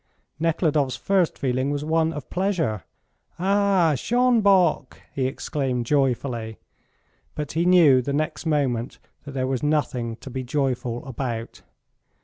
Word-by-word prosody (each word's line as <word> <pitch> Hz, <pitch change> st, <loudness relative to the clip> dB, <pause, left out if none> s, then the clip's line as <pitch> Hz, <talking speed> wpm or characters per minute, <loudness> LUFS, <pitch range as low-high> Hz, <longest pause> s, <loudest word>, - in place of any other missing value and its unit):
Nekhludoff's 155 Hz, -4 st, +1 dB
first 190 Hz, -4 st, +1 dB
feeling 130 Hz, 0 st, -1 dB
was 145 Hz, 0 st, -2 dB
one 160 Hz, 0 st, +1 dB
of 150 Hz, -5 st, -7 dB
pleasure. 165 Hz, -, -1 dB, 0.5 s
"Ah, 195 Hz, -3 st, +2 dB
Schonbock!" 200 Hz, -, +2 dB
he 130 Hz, -2 st, 0 dB
exclaimed 130 Hz, -2 st, -2 dB
joyfully; 125 Hz, -4 st, -1 dB, 0.8 s
but 150 Hz, -2 st, -4 dB
he 170 Hz, +3 st, 0 dB
knew 160 Hz, -8 st, +6 dB
the 140 Hz, -, -3 dB
next 155 Hz, +3 st, -2 dB
moment 135 Hz, -5 st, 0 dB, 0.3 s
that 140 Hz, -, -8 dB
there 130 Hz, -1 st, -1 dB
was 130 Hz, -1 st, -2 dB
nothing 135 Hz, -6 st, -1 dB
to 130 Hz, -, -11 dB
be 130 Hz, -, -3 dB
joyful 125 Hz, -2 st, -2 dB
about. 120 Hz, -3 st, -5 dB
145 Hz, 125 wpm, -24 LUFS, 130-165 Hz, 0.8 s, knew